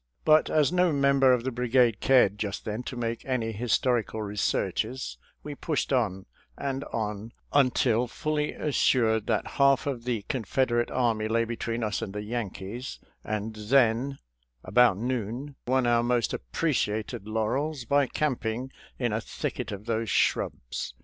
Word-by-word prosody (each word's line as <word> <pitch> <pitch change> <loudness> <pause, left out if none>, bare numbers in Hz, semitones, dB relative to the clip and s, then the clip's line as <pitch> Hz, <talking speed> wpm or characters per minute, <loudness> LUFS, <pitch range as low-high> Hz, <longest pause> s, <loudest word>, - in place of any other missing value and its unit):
But 155 0 +5
as 155 -1 +3
no 180 -1 +3
member 140 -2 +4
of 125 -2 +2
the 130 - -2
brigade 125 -2 +2
cared 105 -7 +4
just 100 -2 -3
then 110 +2 -3
to - - -5
make 115 -1 -3
any 125 -4 -1
his 115 +2 -2
torical 115 -3 -1
researches, 105 - -2 0.2
we 150 - -5
pushed 145 -1 -2
on 100 -7 0 0.3
and 135 0 -3
on 105 +1 -4 0.2
until 125 -3 +3
fully 150 +4 -2
assured 115 -7 +2
that - - +1 0.2
half 140 -1 +5
of 125 -5 -3
the 120 -5 -1
Confederate 120 0 0
army 115 -4 +1
lay 115 +1 +1
between 115 0 -3
us 105 -4 -1
and 95 - -5
the 105 - -3
Yankees, 115 +1 -5 0.3
and 110 +1 -3
then 120 +4 +2 0.2
— - - -44
about 115 +1 +4
noon 125 +4 -3
— - - -50
won 130 0 +2
our 120 -1 +3
most 120 -1 +1
appreciated 105 - -2
laurels 125 +6 -1
by 140 +2 +3
camping 125 -3 -2 0.3
in 120 -4 -1
a 110 - -1
thicket 115 0 -4
of 100 +1 -7
those 115 -1 -1
shrubs. - - -1
120 Hz, 155 wpm, -27 LUFS, 110-130 Hz, 0.3 s, But